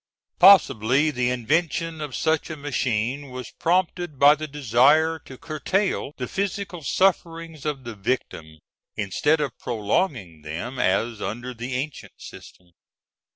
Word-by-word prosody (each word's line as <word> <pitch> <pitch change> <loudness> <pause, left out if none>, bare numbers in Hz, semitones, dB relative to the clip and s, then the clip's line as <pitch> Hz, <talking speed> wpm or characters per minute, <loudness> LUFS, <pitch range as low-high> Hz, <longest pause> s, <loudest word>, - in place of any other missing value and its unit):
] - - -50
Possibly 145 - +6
the 125 -3 0
invention 160 +6 -1
of 145 -5 -5
such 160 +6 0
a 155 - -6
machine 130 -1 -2
was 125 -1 -8
prompted 175 -2 -1
by 145 +2 +7
the 155 +1 -5
desire 145 +4 +3
to 130 - -11
curtail 165 +1 -2
the 125 - -4
physical 195 -1 -3
sufferings 165 -2 0
of 140 -3 -3
the 120 -1 -6
victim, 95 -7 -4 0.4
instead 145 +10 +1
of 140 -5 -3
prolonging 105 - -2
them, 90 - -6
as 110 +1 0
under 120 +4 -4
the 120 +2 -5
ancient 140 +3 -5
system. 90 -1 -13
140 Hz, 135 wpm, -24 LUFS, 120-160 Hz, 0.4 s, by